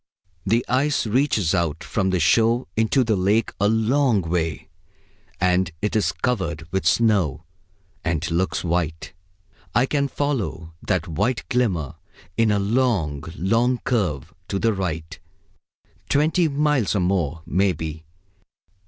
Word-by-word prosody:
The 115 +5 +2
ice 135 +3 +1
reaches 110 - +1
out 85 -2 -1
from 95 -3 -1
the 95 -1 +1
shore 115 +8 +3
into 110 +4 +2
the 110 -2 +1
lake 100 +4 +1
a 100 - +4
long 110 0 +2
way; 80 -3 -2 0.7
and 90 0 +2
it 105 +4 -2
is 110 - +2
covered 85 -10 -2
with 95 - 0
snow, 95 - +2 0.6
and 85 -1 -1
looks 90 +3 0
white. 85 -1 -2 0.6
I 120 - +4
can 140 0 0
follow 115 - -3
that 90 -1 0
white 105 +9 -1
glimmer 85 - 0 0.4
in 115 -1 +3
a 105 - +2
long, 100 - 0
long 115 +7 +2
curve 90 - -1
to 100 - -2
the 110 +2 +1
right 85 -5 -4 0.9
twenty 160 +4 +3
miles 145 -7 +1
or - - +2
more, 85 -4 -1
maybe. 80 -4 -1
100 Hz, 130 wpm, -23 LUFS, 85-120 Hz, 0.9 s, a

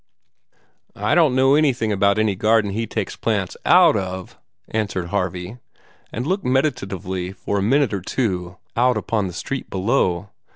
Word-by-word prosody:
"I 105 +1 0
don't 155 -7 +4
know 135 +1 +4
anything 135 -7 +2
about 100 0 +2
any 110 -1 +2
garden 110 +1 +2
that 105 - -3
he 115 - -2
takes - - -3
plants - - -1
out - - +6
of," 95 -2 -4 0.3
answered 100 -5 -2
Harvey, 95 +3 -3 0.5
and 120 - -4
looked 190 +5 -1
meditatively 95 - -1
for 100 +2 -2
a - - -1
minute 130 +3 +2
or 100 - -2
two 90 -5 -2 0.2
out 125 0 +3
upon 105 -1 -1
the 90 - -7
street 135 +10 -5
below. 95 -2 0
105 Hz, 160 wpm, -21 LUFS, 95-125 Hz, 0.5 s, out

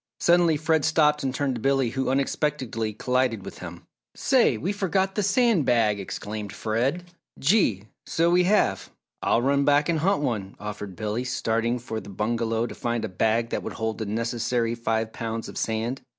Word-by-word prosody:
Suddenly 170 -2 +4
Fred 155 0 +1
stopped 150 -2 +3
and 135 - 0
turned 135 0 -1
to 120 - -5
Billy 135 -2 +2
who 135 0 -1
unexpectedly 130 -4 -1
collided 125 -1 0
with - - -9
him. - - -9 0.3
"Say! - - +3
We 185 - -2
forgot 190 -1 0
the 210 - 0
sand 205 - +3
bag!" 110 -4 +2
exclaimed 105 +1 -5
Fred. 120 - -1 0.3
"Gee! 135 - +2 0.2
So 170 +1 +2
we 180 0 +4
have 95 - +2 0.3
I'll 120 - +2
run 140 +1 +2
back 145 +2 +3
and 165 -2 +1
hunt 185 -1 +1
one," 100 -7 -2
offered 105 -2 -6
Billy, 110 +5 -2
starting 115 -1 0
for 115 -2 -5
the 100 -1 -11
bungalow 115 +3 -1
to - - -6
find 120 -1 -2
a - - -5
bag 110 +5 +1
that - - -1
would - - -6
hold 110 0 -3
the 110 - -3
necessary 115 +2 -1
five 115 -1 -1
pounds 115 0 -4
of - - -9
sand. 115 +4 -2
120 Hz, 180 wpm, -25 LUFS, 110-150 Hz, 0.3 s, Suddenly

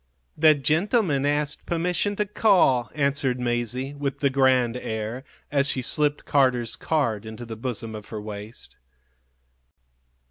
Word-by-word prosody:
"The 155 0 +6
gentleman 155 - +1
asked 145 0 -1
permission 180 +4 0
to 210 - 0
call," 180 - +3
answered 140 -3 0
Masie, 125 +2 -2
with 140 -1 -3
the 140 -1 +2
grand 130 -3 +3
air, 110 +1 -4 0.3
as 140 -1 +2
she 130 -2 0
slipped 150 +3 0
Carter's 130 -4 +2
card 115 -10 -1
into 110 +2 -8
the 115 -1 -7
bosom 115 -1 -4
of 105 -1 -8
her 110 - -6
waist. 105 +2 -9
135 Hz, 135 wpm, -25 LUFS, 120-150 Hz, 0.3 s, The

